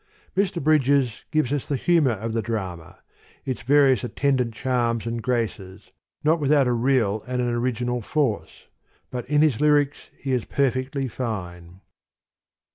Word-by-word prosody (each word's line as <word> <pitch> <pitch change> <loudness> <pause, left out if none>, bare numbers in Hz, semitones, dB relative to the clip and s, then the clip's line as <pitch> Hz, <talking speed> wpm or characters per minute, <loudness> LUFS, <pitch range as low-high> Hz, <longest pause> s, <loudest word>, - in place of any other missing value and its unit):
Mr. 190 -2 +1
Bridges 140 -5 +2
gives 155 -4 +1
us 145 - -2
the 145 - -1
humour 155 -3 +3
of 110 +2 -4
the 115 - 0
drama, 95 -6 -5 0.5
its 130 -2 -3
various 135 -2 +4
attendant 125 -1 0
charms 120 -1 -1
and 115 0 -3
graces, 110 -6 -3 0.3
not 160 +2 +3
without 145 -1 +3
a 125 - +1
real 115 -4 +1
and 125 0 -2
an 120 -1 0
origi 120 0 -1
nal 125 0 -1
force: 110 - -2 0.5
but 125 0 -5
in 150 0 +4
his 145 -5 +2
lyrics 145 -1 +2
he 135 - -4
is 125 -3 +1
perfectly 135 0 -1
fine. 90 -7 -6
125 Hz, 150 wpm, -24 LUFS, 115-140 Hz, 0.5 s, various